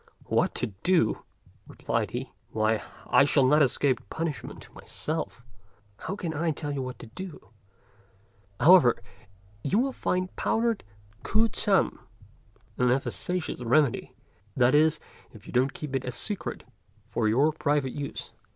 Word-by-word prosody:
"What - - +1
to - - 0 0.2
do!" 175 -12 +2 0.5
replied - - -2
he; - - -5 0.2
"why, 110 0 +1 0.2
I - - +5
shall 140 -1 +4
not 150 +4 +5
escape 130 -2 +1
punishment 160 -7 -5
myself; 115 - -5 0.5
how 190 - -5
can 170 -5 -4
I 160 +2 0
tell 150 -1 -3
you 140 -1 -2
what 130 -1 -5
to - - -10
do. 150 - -9 1.1
However, 165 -8 +7 0.6
you 145 - +1
will 265 +4 +2
find 185 -6 -2
powdered 225 -2 0 0.4
K'u 220 +2 +3
ts'an 200 -3 +1 0.8
an 125 0 +4
efficacious 135 - -2
remedy, 125 +2 +2 0.4
that 125 +1 +4
is 155 +1 +4 0.3
if 110 -1 -14
you - - -10
don't 130 +2 +3
keep 150 -3 -5
it 130 - -1
a 125 - -3
secret 205 - -4 0.5
for 110 - +1
your 135 +8 +4
private 145 -4 0
use." 145 -1 -5
145 Hz, 140 wpm, -27 LUFS, 125-170 Hz, 1.1 s, However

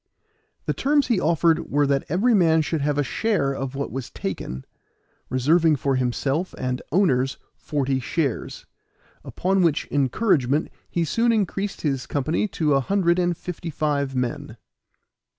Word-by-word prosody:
The - - 0
terms 285 -1 +1
he 230 -6 +3
offered 165 0 +2
were 145 +1 +2
that 140 -1 +1
every 205 - +2
man 165 -5 +4
should 150 +1 -2
have 145 0 0
a 145 - +2
share 140 - 0
of 135 0 -4
what 140 +1 -3
was 130 -2 -5
taken, 65 +1 -5 0.6
reserving 155 +5 +3
for 135 0 0
himself 135 +7 -1
and 125 0 -2
owners 135 -7 +2 0.2
forty 135 -3 -1
shares. 135 0 -3 0.6
Upon 190 +1 0
which 165 -4 +1
encouragement 145 - +1 0.2
he 170 -1 0
soon 230 +9 +2
increased 205 -2 -1
his 135 -4 -1
company 155 +8 0
to 155 -6 0
a 135 - +4
hundred 175 +3 +1
and 175 -1 +1
fifty 175 -1 -6
five 145 -3 -1
men. 125 -2 -3
150 Hz, 150 wpm, -23 LUFS, 135-180 Hz, 0.6 s, man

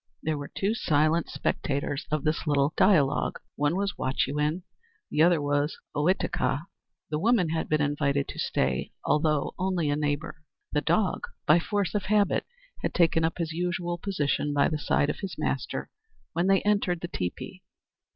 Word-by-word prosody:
There 155 0 0
were 145 - -5
two 200 +3 -1
silent 155 -4 +2
spectators 140 0 -2
of 155 -2 -1
this 155 +1 -1
little 145 0 +2
dialogue. 150 -8 +3 0.2
One 145 +3 +1
was 200 +1 -1
Wahchewin, 150 +5 0 0.5
the 150 - +2
other 170 0 +5
was 145 +1 0 0.2
Ohitika. 150 -2 +1 0.5
The 150 - 0
woman 205 -3 +3
had 160 0 -2
been 155 0 +2
invited 145 -1 0
to - - -7
stay, 65 -1 -1
although 150 0 +1
only 180 -5 0
a - - +1
neighbor. 150 +2 -2 0.3
The 150 - +2
dog, 180 +5 +1 0.2
by 155 +3 +6
force 200 +2 -1
of 205 -2 -1
habit, 205 0 +2 0.3
had - - -2
taken 165 -2 +3
up 160 - 0
his 165 -2 -2
usual 175 +1 -2
position 150 -6 -1
by 140 - +4
the 155 - -2
side 145 0 +2
of - - -8
his 195 -2 -5
master - - -2 0.4
when 175 +2 +1
they 195 0 +4
entered 200 -4 +1
the 175 - -3
teepee. 90 - -5
160 Hz, 165 wpm, -27 LUFS, 145-180 Hz, 0.5 s, by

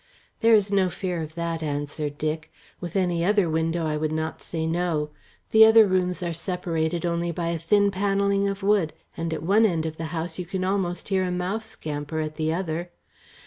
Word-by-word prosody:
"There 225 0 +6
is 205 -1 +2
no 195 -2 +3
fear 180 -1 -3
of 155 0 -7
that," 170 -1 -2
answered 145 0 -3
Dick. 155 +1 -3 0.3
"With 175 -1 -7
any 175 -3 +1
other 200 -1 +3
window 160 +1 0
I 155 -1 0
would 155 0 -1
not 160 0 -3
say 160 -1 -3
no. 160 -3 -1 0.4
The 220 0 +8
other 220 0 +8
rooms 180 -1 0
are 170 -1 -2
separated 170 -1 -2
only 170 0 0
by 170 0 -2
a 170 -1 -2
thin 200 +5 +3
panelling 200 0 +1
of 195 0 -3
wood, 195 -6 +2 0.2
and 165 0 -3
at 155 -1 -3
one 200 +6 +4
end 170 -7 +2
of 160 0 -4
the 165 - -4
house 165 +3 -4
you 180 - -3
can 185 +1 -2
almost 185 -2 -1
hear 190 -1 +2
a 185 - -1
mouse 180 +5 -2
scamper 150 +1 -4
at 155 0 -4
the 155 0 0
other. 170 0 -2
170 Hz, 205 wpm, -25 LUFS, 160-190 Hz, 0.4 s, The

